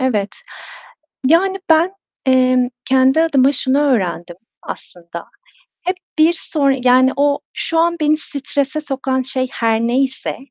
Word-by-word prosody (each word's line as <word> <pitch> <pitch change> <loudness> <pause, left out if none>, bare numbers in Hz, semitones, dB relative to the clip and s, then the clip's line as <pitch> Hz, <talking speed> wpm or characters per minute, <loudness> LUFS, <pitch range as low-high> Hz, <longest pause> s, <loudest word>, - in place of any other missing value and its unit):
evet. 215 -6 0 1.0
Yani, 370 +6 +3
ben, 325 +4 +4 0.3
emm, 255 -1 +3 0.2
kendi 265 +4 +3
adıma 280 -4 +3
şunu 265 0 +1
öğrendim 185 -11 -1 0.3
aslında. 170 -1 -9 0.6
Hep 365 +2 -2 0.2
bir 315 +2 +4
sonra, 285 -5 0
yani 255 +1 +4
o 285 0 +1
şu 330 - -1
an 340 +1 +2
beni 305 0 +2
strese 280 -1 -3
sokan 265 -3 -2
şey 260 0 -2
her 225 -1 0
neyse, 260 +3 -1
265 Hz, 125 wpm, -17 LUFS, 255-305 Hz, 1.0 s, ben